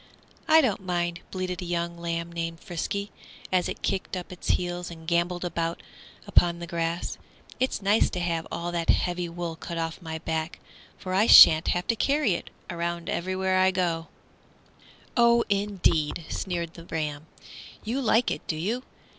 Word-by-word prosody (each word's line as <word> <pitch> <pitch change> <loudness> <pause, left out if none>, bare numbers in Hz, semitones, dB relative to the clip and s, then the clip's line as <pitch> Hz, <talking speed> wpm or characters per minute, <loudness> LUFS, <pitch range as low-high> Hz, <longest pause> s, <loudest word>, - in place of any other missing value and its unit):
"I 320 0 +7
don't 215 -8 0
mind," 175 -2 -1
bleated 185 -1 -4
a - - -5
young 170 0 -2
lamb 170 0 -3
named 165 -1 -4
Frisky, 200 +4 -4 0.4
as 185 -1 +2
it - - -6
kicked 190 -1 -2
up 180 - -7
its 180 - -8
heels 175 0 0
and 160 -1 -11
gambolled 175 +1 0
about 165 -1 -2 0.4
upon 170 -1 +3
the 170 - -6
grass; 170 0 -3 0.4
"it's 255 -5 -1
nice 205 +3 +4
to 180 - -4
have 170 -2 -1
all 170 +1 -3
that 170 -1 -2
heavy 175 -1 +1
wool 170 -1 -4
cut 170 +1 -6
off 165 +2 -3
my 160 -2 -5
back, 160 +1 -3 0.4
for 185 - -5
I 205 +4 +4
sha'n't 160 +1 +9
have 180 0 0
to 230 - +1
carry 280 -1 +2
it 170 - -5 0.2
around 170 0 -3
wherever 185 +1 0
I 185 0 +5
go." 170 -3 -1 1.1
"Oh, 235 -1 +5
indeed!" 190 -6 +1
sneered 170 -3 -3
the 170 - -12
ram, 155 -2 -4 0.6
"you 245 +5 -2
like 235 -1 +3
it, - - -3
do 160 - -1
you? 210 +11 -2
175 Hz, 170 wpm, -27 LUFS, 170-190 Hz, 1.1 s, sha'n't